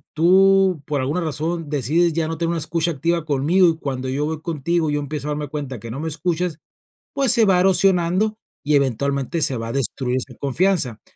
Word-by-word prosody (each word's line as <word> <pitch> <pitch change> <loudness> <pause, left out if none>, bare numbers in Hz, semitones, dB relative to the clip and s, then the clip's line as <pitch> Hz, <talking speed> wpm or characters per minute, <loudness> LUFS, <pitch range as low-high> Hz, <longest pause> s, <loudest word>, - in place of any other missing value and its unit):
tú 190 +1 +4
por 145 -2 -1
alguna 145 +7 -1
razón 160 +1 -3
decides, 155 +5 +1
ya 160 0 -1
no 160 -1 -4
tener 165 0 -1
una 170 - -1
escucha 165 +2 -1
activa 165 +2 -1
conmigo, 155 +6 +3
y 160 - -2
cuando 130 -4 -4
yo 140 +3 -1
voy 155 0 -4
contigo, 165 0 -1
yo 145 - 0
empiezo 145 0 -5
a - - -1
darme 150 -1 -4
cuenta 140 -5 -5
que 115 - -8
no 135 - -5
me 160 - -3
escuchas, 165 +1 -2 0.6
pues, 275 -3 +3
se 235 -2 +4
va 190 -2 +4
erosionando 190 +2 +2 0.3
y 150 +1 +3
eventualmente 140 +4 0
se 135 - +1
va 115 0 -5
a - - -4
destruir 130 -1 -1
esa 130 0 -6
confianza. 140 - 0
155 Hz, 205 wpm, -21 LUFS, 140-175 Hz, 0.6 s, tú